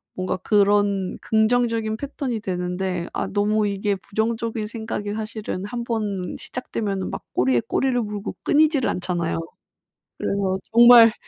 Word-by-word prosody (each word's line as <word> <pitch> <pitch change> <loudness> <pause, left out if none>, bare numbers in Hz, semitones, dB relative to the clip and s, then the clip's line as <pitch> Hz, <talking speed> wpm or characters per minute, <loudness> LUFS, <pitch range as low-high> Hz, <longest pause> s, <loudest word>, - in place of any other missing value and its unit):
뭔가 185 0 -2
그런 205 -2 +2
긍정적인 225 0 +1
패턴이 265 -4 -4
되는데 180 -1 -2
아 - - -2
너무 210 +1 +1
이게 200 0 0
부정적인 220 +2 -2
생각이 220 -2 -4
사실은 215 -3 -4
한번 215 -5 -3
시작되면은 200 -6 -4
막 - - -6
꼬리에 125 -1 +2
꼬리를 255 -2 +1
물고 210 -2 -5
끊이지를 300 -3 +3
않잖아요. 175 -2 -2 0.8
그래서 190 -1 0
정말, 235 -1 +9
210 Hz, 310 characters per minute, -23 LUFS, 190-230 Hz, 0.8 s, 정말